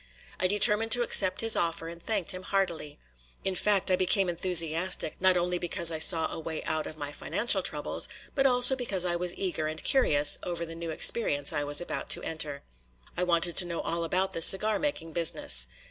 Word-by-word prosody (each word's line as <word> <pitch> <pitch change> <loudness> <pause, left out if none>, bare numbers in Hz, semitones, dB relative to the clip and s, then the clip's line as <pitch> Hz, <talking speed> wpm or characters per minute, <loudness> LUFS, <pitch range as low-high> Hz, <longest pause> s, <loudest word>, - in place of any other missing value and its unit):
I 185 - 0
determined 210 +3 +3
to 245 -1 +1
accept 190 -5 +1
his 225 -1 +3
offer 165 -1 -3
and 170 0 -11
thanked 205 -4 -1
him 185 -1 -8
heartily. 175 -7 -4 0.5
In 190 - -2
fact, 195 0 -1
I - - +3
became 185 +1 -1
enthusiastic, 170 -1 +1
not 185 -1 +2
only 175 0 -3
because 170 -1 -2
I 160 - -5
saw 160 0 +6
a - - -8
way 160 0 -7
out 155 -1 -4
of 155 - -11
my 145 -1 -7
financial 205 +6 -1
troubles, 150 -4 -3 0.2
but 275 -1 +1
also 250 +1 +4
because 200 -8 -2
I 175 -1 -1
was 175 0 -2
eager 170 -5 -4
and 155 0 -7
curious 150 - +3
over 170 -1 -5
the 165 - -11
new 165 0 -8
experience 150 -3 +2
I 145 - -3
was 145 0 -1
about 175 - -7
to - - -13
enter. 150 -3 -4 0.5
I - - -4
wanted 175 -1 +1
to 180 - +6
know 170 -1 -6
all 170 0 -4
about 185 +3 -2
the 165 - -5
cigar 205 +5 +3
making 165 - -5
business. 65 - +3
175 Hz, 205 wpm, -26 LUFS, 160-195 Hz, 0.5 s, saw